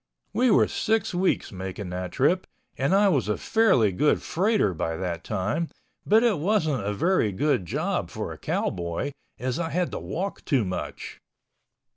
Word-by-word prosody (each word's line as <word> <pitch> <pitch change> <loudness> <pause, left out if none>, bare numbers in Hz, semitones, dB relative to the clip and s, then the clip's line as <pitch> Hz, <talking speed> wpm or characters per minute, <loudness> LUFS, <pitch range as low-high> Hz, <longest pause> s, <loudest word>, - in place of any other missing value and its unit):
We 250 +1 +3
were 210 - +5
six 220 -3 0
weeks 180 +1 +1
making 95 0 -6
that 90 0 -4
trip, 170 +8 +2 0.3
and 140 +8 +1
I 205 +1 +5
was 135 - +1
a 105 - +1
fairly 160 - +3
good 145 +11 +2
freighter 195 - +1
by 80 0 -2
that 85 -3 -3
time, 110 - -1 0.4
but 220 +3 +5
it 220 -9 +2
wasn't 155 - +1
a 100 - -1
very 155 - +2
good 100 - 0
job - - -1
for - - -5
a - - -11
cowboy, 85 +10 -2 0.3
as 125 +3 -2
I 165 -1 -1
had 180 +1 -1
to - - -4
walk 195 +4 -4
too 130 -8 +1
much. 90 -6 -5
140 Hz, 170 wpm, -26 LUFS, -, 0.4 s, were